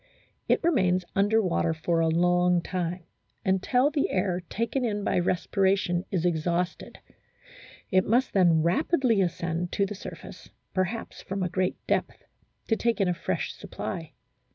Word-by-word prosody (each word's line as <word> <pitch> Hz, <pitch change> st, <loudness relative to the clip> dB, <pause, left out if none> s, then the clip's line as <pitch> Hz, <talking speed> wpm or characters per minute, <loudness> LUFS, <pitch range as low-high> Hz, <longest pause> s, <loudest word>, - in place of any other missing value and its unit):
It -, -, +2 dB
remains 185 Hz, -, +2 dB
under 210 Hz, +3 st, +3 dB
water 165 Hz, -2 st, 0 dB
for 165 Hz, +1 st, 0 dB
a 165 Hz, -, +3 dB
long 175 Hz, +1 st, +3 dB
time 180 Hz, -1 st, -3 dB, 0.4 s
until 245 Hz, +9 st, +2 dB
the 290 Hz, -1 st, 0 dB
air 185 Hz, -1 st, 0 dB
taken 230 Hz, +4 st, -1 dB
in 210 Hz, -3 st, -1 dB
by -, -, +1 dB
respiration 185 Hz, 0 st, +1 dB
is 180 Hz, -3 st, -1 dB
exhausted; 175 Hz, +1 st, -1 dB, 0.9 s
it 185 Hz, 0 st, +3 dB
must 245 Hz, +4 st, +2 dB
then 170 Hz, -5 st, +4 dB
rapidly 245 Hz, -, +2 dB
ascend 175 Hz, -1 st, -2 dB
to 200 Hz, -, +2 dB
the 200 Hz, -, -5 dB
surface, 200 Hz, -, -10 dB, 0.2 s
perhaps 190 Hz, +5 st, -2 dB
from 195 Hz, 0 st, -3 dB
a 180 Hz, -, -1 dB
great 185 Hz, +1 st, -1 dB
depth, -, -, -1 dB, 0.4 s
to 225 Hz, -, +2 dB
take 235 Hz, 0 st, 0 dB
in 195 Hz, -, +2 dB
a -, -, +2 dB
fresh 175 Hz, -, -3 dB
supply. 165 Hz, -4 st, -6 dB
185 Hz, 150 wpm, -27 LUFS, 175-210 Hz, 0.9 s, then